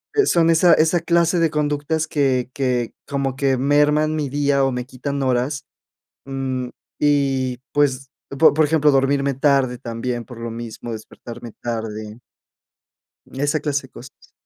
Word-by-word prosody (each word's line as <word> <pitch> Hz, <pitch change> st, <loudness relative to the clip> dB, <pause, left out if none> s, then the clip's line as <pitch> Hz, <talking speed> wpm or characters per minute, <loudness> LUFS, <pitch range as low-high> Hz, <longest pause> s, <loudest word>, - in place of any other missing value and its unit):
eh, 420 Hz, -, +4 dB
son 165 Hz, -1 st, +3 dB
esa 165 Hz, +2 st, +5 dB
esa 160 Hz, +2 st, +3 dB
clase 170 Hz, +1 st, +2 dB
de 165 Hz, -2 st, +2 dB
conductas 150 Hz, +1 st, -1 dB
que 130 Hz, -4 st, 0 dB
que 125 Hz, -3 st, -1 dB
como 140 Hz, -2 st, -2 dB
que 135 Hz, -1 st, +1 dB
merman 150 Hz, +3 st, +2 dB
mi 150 Hz, -2 st, -1 dB
día 140 Hz, 0 st, +1 dB
o 135 Hz, -, +1 dB
me 125 Hz, 0 st, -3 dB
quitan 140 Hz, +2 st, -4 dB
horas, 130 Hz, +2 st, 0 dB, 0.6 s
mm, 130 Hz, -2 st, -3 dB, 0.3 s
y, 135 Hz, -3 st, +1 dB
pues, 135 Hz, -2 st, +1 dB, 0.3 s
por 160 Hz, -, +7 dB
por 155 Hz, +1 st, +3 dB
ejemplo, 150 Hz, -1 st, +3 dB
dormirme 140 Hz, +1 st, +2 dB
tarde 135 Hz, -2 st, +2 dB
también 120 Hz, +1 st, -4 dB
por 125 Hz, -3 st, -11 dB
lo 115 Hz, 0 st, -5 dB
mismo, 115 Hz, 0 st, -7 dB
despertarme 115 Hz, +1 st, -9 dB
tarde 110 Hz, -1 st, -5 dB, 1.1 s
esa 145 Hz, +3 st, -1 dB
clase 140 Hz, -3 st, -2 dB
de -, -, -37 dB
cosas. 130 Hz, +2 st, -14 dB
135 Hz, 150 wpm, -21 LUFS, 125-150 Hz, 1.1 s, por